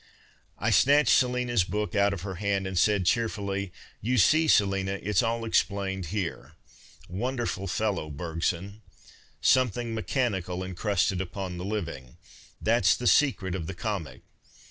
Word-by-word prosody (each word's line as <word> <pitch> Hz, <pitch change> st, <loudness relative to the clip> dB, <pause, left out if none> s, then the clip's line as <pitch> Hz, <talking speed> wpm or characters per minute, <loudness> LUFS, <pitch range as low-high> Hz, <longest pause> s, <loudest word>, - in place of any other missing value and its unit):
I -, -, 0 dB
snatched 145 Hz, -2 st, +5 dB
Selina's 125 Hz, -4 st, +2 dB
book 105 Hz, +4 st, -3 dB
out 100 Hz, -1 st, +3 dB
of 95 Hz, -3 st, -5 dB
her 95 Hz, -1 st, -4 dB
hand, 100 Hz, -1 st, 0 dB
and 95 Hz, 0 st, -4 dB
said, 100 Hz, +1 st, +2 dB
cheerfully, 100 Hz, -3 st, -1 dB, 0.2 s
" -, -, -29 dB
You 125 Hz, +4 st, 0 dB
see, 155 Hz, -, +4 dB
Selina, 95 Hz, -5 st, +2 dB
it's 100 Hz, 0 st, 0 dB
all 115 Hz, 0 st, -1 dB
explained 100 Hz, -4 st, 0 dB
here. 90 Hz, -1 st, -4 dB, 0.5 s
\V'onderful 110 Hz, -1 st, -3 dB
fellow, 95 Hz, -5 st, -1 dB
Bergson. 85 Hz, +6 st, -3 dB, 0.3 s
' -, -, -22 dB, 0.3 s
Something 120 Hz, -2 st, +2 dB
mechanical 100 Hz, -6 st, -2 dB
encrusted 95 Hz, 0 st, 0 dB
upon 95 Hz, -1 st, -5 dB
the 90 Hz, -, -5 dB
living,' 85 Hz, -11 st, -5 dB, 0.4 s
that 115 Hz, -2 st, +1 dB
s 90 Hz, -, +6 dB
the 125 Hz, -, -6 dB
secret 115 Hz, -9 st, +3 dB
of 85 Hz, -3 st, -4 dB
the 95 Hz, -, -5 dB
comic. 95 Hz, -5 st, -4 dB
100 Hz, 145 wpm, -27 LUFS, 95-115 Hz, 0.5 s, s